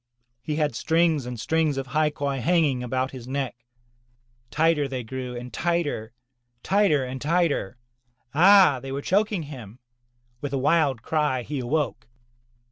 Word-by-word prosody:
He 150 +4 -3
had 150 -3 0
strings 160 -4 +1
and 125 -2 -6
strings 155 +2 0
of 135 - -2
hai 150 +4 +1
quai 140 -2 -3
hanging 150 -3 +2
about 130 +2 -2
his 125 -2 -9
neck. 130 -3 -4 0.8
Tighter 160 -2 +2
they 130 -2 -4
grew 125 +1 -6
and 125 +1 -8
tighter, 170 -10 -1 0.5
tighter 190 -9 +2
and 130 0 -6
tighter. 155 - 0 0.6
Ah! 180 -3 +6
they 135 +1 -7
were 140 +1 -4
choking 205 -2 +1
him. 125 -7 -10 0.6
With 145 -1 -4
a - - +1
wild 140 -4 +2
cry, 150 -5 0
he 145 +3 -4
awoke. 125 -3 -2
140 Hz, 145 wpm, -25 LUFS, 130-160 Hz, 0.8 s, Ah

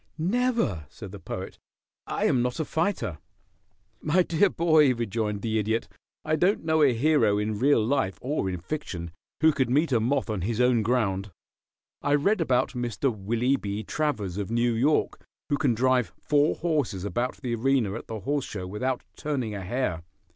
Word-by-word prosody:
"Never," 185 - 0
said - - -10
the - - -9
Poet. - - -7 0.5
"I - - -1
am 125 - +3
not 125 +3 -2
a 160 - 0
fighter." 160 - -1 0.8
"My 170 +4 +3
dear 170 +4 +3
boy," 155 -6 +4
rejoined 110 -2 -2
the 110 -1 0
Idiot, 110 +2 -1 0.4
"I 155 0 +2
don't 185 +6 +1
know 160 -1 +2
a 140 -3 +6
hero 125 -4 +3
in 105 0 -2
real 130 -4 +3
life 115 -7 0
or 130 -7 -1
in 90 -1 -4
fiction 90 - -5 0.3
who 160 0 +6
could 130 -4 0
meet 150 +4 +2
a 120 - +3
moth 130 +5 0
on 105 -4 -2
his 110 +5 -2
own 125 -2 +4
ground. 105 -4 0 0.7
I 145 0 +2
read 190 +7 +2
about 130 -5 +2
Mr. 120 0 -1
Willie 120 +7 0
B. 100 -1 -4
Travers, 105 - -2
of 100 - -3
New 120 +1 +1
York, 140 +7 +1 0.3
who 145 - +1
can 135 -7 +2
drive 125 -4 +2
four 150 +1 +2
horses 145 - -1
about 120 +5 -2
the 125 -3 -3
arena 120 -3 +1
at 115 - -7
the 110 -2 -5
horse 145 +3 -1
show 95 -3 -6
without 125 +7 -2
turning 130 -8 -3
a 100 - -5
hair. 95 -3 -2
125 Hz, 180 wpm, -26 LUFS, 105-150 Hz, 0.8 s, a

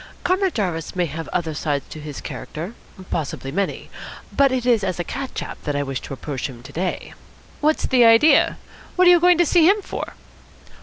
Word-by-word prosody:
Comrade 375 0 +1
Jarvis 175 -8 -2
may 180 -1 +1
have 160 0 -6
other 165 -3 -2
sides 145 -2 -2
to 155 - -8
his 150 -2 -7
character 170 +8 -7 0.4
possibly 140 -4 -3
many 195 +5 -3 0.4
but 275 -1 +4
it 255 -2 -1
is 235 -4 +3
as 185 -2 -2
a - - 0
cat 270 +9 -6
chap - - -5
that 145 -2 -2
I 145 - 0
wish 135 -2 -4
to - - -7
approach 135 0 -4
him 120 -2 -12
to - - -12
day." 180 +3 -3 0.5
"What's 305 +1 +1
the 250 -2 +4
idea? 230 +7 +5 0.4
What 365 0 +5
are - - +9
you 350 - +6
going 355 0 +5
to 345 - +4
see 335 +1 +5
him 415 +2 +4
for?" - - -6
185 Hz, 205 wpm, -22 LUFS, -, 0.5 s, are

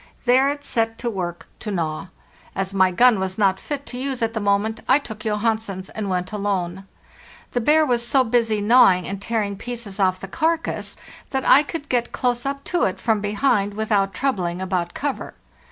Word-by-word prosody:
There 260 +3 +4
it 285 0 -4
set 225 -3 -1
to 240 -1 -2
work 175 -4 -4
to 220 - -6
gnaw. 165 -4 -2 0.5
As 195 0 -2
my 190 -1 +4
gun 230 +4 +4
was 190 0 -2
not 195 -3 +2
fit 285 -1 -5
to 250 - -6
use 265 -2 -2
at 225 0 0
the 220 - -2
moment, 205 +2 +1
I 260 - +7
took 220 -7 -8
Johansen's 215 -3 -2
and 210 -2 -4
went 180 -1 -2
alone. 195 -2 -2 0.6
The 245 - 0
bear 305 +6 +4
was 240 -4 +1
so 260 +2 +3
busy 225 -3 +1
gnawing 205 -5 +5
and 195 0 -5
tearing 210 -2 -1
pieces 230 -4 -5
off 185 -1 +2
the 195 - -7
carcass 325 - -1 0.3
that 265 -1 -2
I 275 - +8
could 300 0 -6
get 240 -3 0
close 245 +1 -1
up 275 0 -3
to 350 - +1
it 185 - -2
from 220 -3 +1
behind 205 -1 +1
without 205 -2 +1
troubling 185 -6 -1
about 180 -2 -2
cover. 285 -1 -4
220 Hz, 190 wpm, -22 LUFS, 195-250 Hz, 0.6 s, I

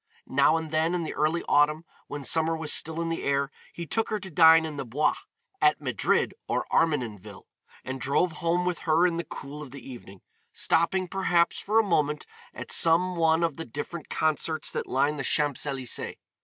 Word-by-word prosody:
Now 140 +4 +3
and 160 -1 -5
then 160 +2 +1
in 175 - -1
the 160 - -4
early 160 +3 0
autumn 150 +3 +3 0.2
when 145 -1 -6
summer 160 +3 +2
was 160 -2 0
still 160 +1 +1
in 165 - -2
the 165 - -3
air 140 0 0 0.2
he 170 - -7
took 225 +7 -1
her 215 - -1
to 190 -2 -9
dine 160 0 +6
in 155 -2 -6
the 140 - -3
Bois, 130 +5 +1 0.5
at 380 -1 +4
Madrid - - 0
or - - -1
Armenenville, 110 - -1 0.4
and 130 0 -6
drove 145 +6 +1
home 170 +2 -1
with 180 -1 -1
her 165 +2 +2
in 170 -2 +1
the 170 - -2
cool 145 0 -9
of 145 - -8
the 140 +2 -11
evening, 115 -7 -11 0.3
stopping, 185 +3 +1
perhaps, 175 -2 +1
for 215 +2 0
a 225 - +6
moment 150 -7 0 0.3
at - - -8
some 180 +2 +3
one 165 0 +2
of 165 -4 -1
the 165 - -5
different 145 +6 -7
concerts 155 0 -1
that - - -4
lined 140 +3 0
the - - -2
Champs 145 +1 0
Elysées. 130 -4 -3
160 Hz, 195 wpm, -27 LUFS, 140-170 Hz, 0.5 s, dine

